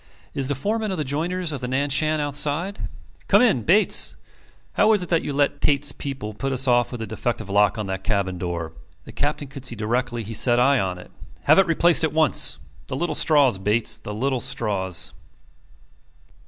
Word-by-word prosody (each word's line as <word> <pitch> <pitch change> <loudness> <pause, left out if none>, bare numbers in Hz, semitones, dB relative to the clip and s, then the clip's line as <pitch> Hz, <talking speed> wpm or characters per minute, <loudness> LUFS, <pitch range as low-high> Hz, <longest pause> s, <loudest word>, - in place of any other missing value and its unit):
"Is 135 -2 -1
the 145 - -1
foreman 215 +9 -2
of 190 - -3
the 155 - -1
joiners 160 +4 -3
on 140 - -4
the 125 - -5
Nan 140 +3 -1
Shan 155 +3 +2
outside?... 150 +6 -1 0.4
Come - - +5
in, 205 - +3
Bates. 195 - +3 0.6
How 220 - +3
is 205 -4 +2
it 180 - -8
that 165 -2 +2
you - - -4
let 145 0 0
Tait's 145 0 +2
people 135 -7 -6
put 135 +6 -4
us 130 0 +3
off 120 -1 +2
with 120 -3 -5
a - - -4
defective 110 -2 -4
lock 105 +1 +3
on 105 - -3
the 95 0 -4
cabin 95 -2 -2
door? 85 -3 -4 0.3
The - - -11
Captain 145 0 -3
could 135 -1 -11
see 120 -2 -6
directly 120 +2 -2
he 110 +2 -7
set 120 +2 +4
eye 135 +1 +3
on 90 -3 -2
it. 90 - -13 0.3
Have - - +5
it 195 - +4
replaced 165 0 +3
at 160 - 0
once. 155 -3 +2 0.3
The - - -5
little 175 +5 -2
straws, 140 -10 +3
Bates... 110 +2 0
the 105 - -8
little 130 +5 -1
straws. 105 - -1
135 Hz, 200 wpm, -22 LUFS, 110-150 Hz, 0.6 s, Come